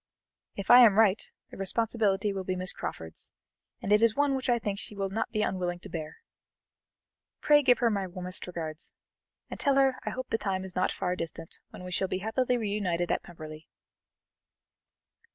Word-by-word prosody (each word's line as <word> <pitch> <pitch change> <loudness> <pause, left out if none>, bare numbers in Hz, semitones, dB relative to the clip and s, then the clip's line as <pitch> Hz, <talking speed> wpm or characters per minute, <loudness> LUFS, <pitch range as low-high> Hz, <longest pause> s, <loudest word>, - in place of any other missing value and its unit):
If 200 +2 0
I 245 - +11
am 220 -5 +7
right, 215 -2 +5 0.3
the - - -10
responsibility 205 0 +1
will 190 -1 -3
be 185 0 -2
Miss 185 -1 0
Crawford's, 80 0 -5 0.5
and 195 - -2
it 210 - +5
is 230 -2 +4
one 285 -1 +2
which 265 -1 -2
I 240 - +4
think 205 -3 -3
she 210 - -4
will 195 -1 -2
not 225 +3 -1
be 215 -1 0
unwilling 180 -3 -1
to - - -10
bear. 160 -1 -6 1.2
Pray 295 -1 +5
give 250 -3 +5
her 235 -2 +2
my 200 -2 -1
warmest 180 0 -4
regards, 165 -2 -5 0.6
and - - -6
tell 280 -2 +2
her 270 -1 +3
I - - -2
hope 255 0 -6
the 225 - +1
time 190 -2 -2
is 185 - -8
not 185 - +1
far 180 -2 -2
distant 165 -1 -5
when - - -11
we 180 - -7
shall 190 +2 0
be 185 - -2
happily 245 +5 0
reunited 200 -6 -1
at - - +1
Pemberley.'" 155 -2 -10
195 Hz, 190 wpm, -29 LUFS, 180-230 Hz, 1.2 s, I